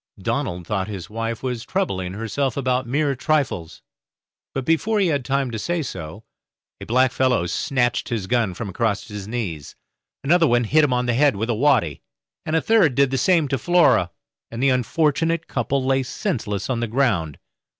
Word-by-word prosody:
Donald 90 0 -2
thought 95 0 -2
his 100 -3 -7
wife 115 +1 -4
was 125 -3 -3
troubling 95 - -2
herself 115 +5 -2
about 130 -2 0
mere 140 +3 +1
trifles, 130 - -1 0.7
but 135 -1 -4
before 205 +7 +1
he 190 -3 +2
had 140 -4 0
time 135 -1 -1
to 110 - -4
say 170 +6 -1
so, 80 - -7 0.6
a - - -8
blackfellow 130 -4 +2
snatched 120 +1 0
his 110 -5 -2
gun 115 -4 0
from 115 - -5
across 100 +1 -2
his 105 -2 -7
knees, 100 -11 -5 0.5
another 165 +3 +4 0.2
hit 155 +8 +3
him 145 - +2
on 125 0 +1
the 120 - +1
head 140 +3 +3
with 110 +4 -1
a - - +1
waddy, 115 - +2 0.5
and 155 - 0
a 160 - +3
third 195 - +4
did 140 -1 +3
the 135 - 0
same 170 -5 +3
to 135 -1 -1
Flora 175 - +3 0.4
and 115 +3 -4
the 135 - +5
unfortunate 155 +6 +1
couple 130 +2 -1
lay 135 0 +2
senseless 120 - -3
on 125 -3 -1
the 120 - -1
ground. 105 - 0
125 Hz, 180 wpm, -22 LUFS, 105-145 Hz, 0.7 s, the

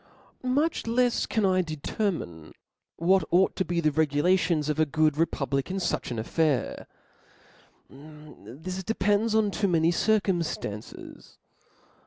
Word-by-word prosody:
Much 280 +3 0
lefs 245 +1 +1
can 220 -3 0
I 185 -1 +3
deceroiine 155 - -4 0.4
what 185 +3 +3
ought 185 +2 +3
to 190 - 0
be 175 -1 -2
the 155 -2 +2
regulations 160 +2 +1
of 150 0 -1
a 155 - +4
good 155 0 +2
republic 140 -3 -1
in 190 - -3
fucb 185 - -2
an 120 - -4
affair*, 140 +4 -1 1.0
this 150 - -10
depends 215 +1 +1
on 215 -2 +2
too 200 0 0
many 165 -2 +2
circumftances. 175 - -2
170 Hz, 125 wpm, -27 LUFS, 150-195 Hz, 1.0 s, a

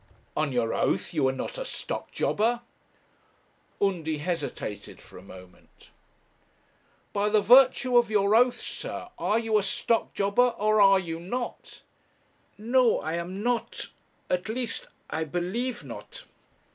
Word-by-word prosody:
'On 150 -2 0
your 120 -3 0
oath, - - 0
you 145 -5 +2
are - - +2
not 130 - -5
a - - -2
stock - - -4
jobber?' 235 +3 0 1.2
Undy 165 -6 0
hesitated 150 - -5
for - - -14
a - - -13
moment. 90 -1 -16 1.2
'By 205 +1 +1
the 215 0 +4
virtue 255 +3 +5
of 240 - 0
your 205 0 +3
oath, 245 +1 +4
sir, - - -6
are 215 - +1
you 225 -2 +2
a - - 0
stock 225 +3 0
jobber, 230 +5 +2
or 215 0 +3
are 195 -1 +7
you 165 -3 -4
not?' 240 +8 -6 0.7
'No, 240 +2 +3
I 160 - -4
am 180 +4 -4
not. 240 -1 -2 0.4
At 180 +3 -1
least, 240 +1 -3 0.2
I 160 - -2
believe 185 - -3
not.' - - -9
205 Hz, 140 wpm, -27 LUFS, 165-235 Hz, 1.2 s, are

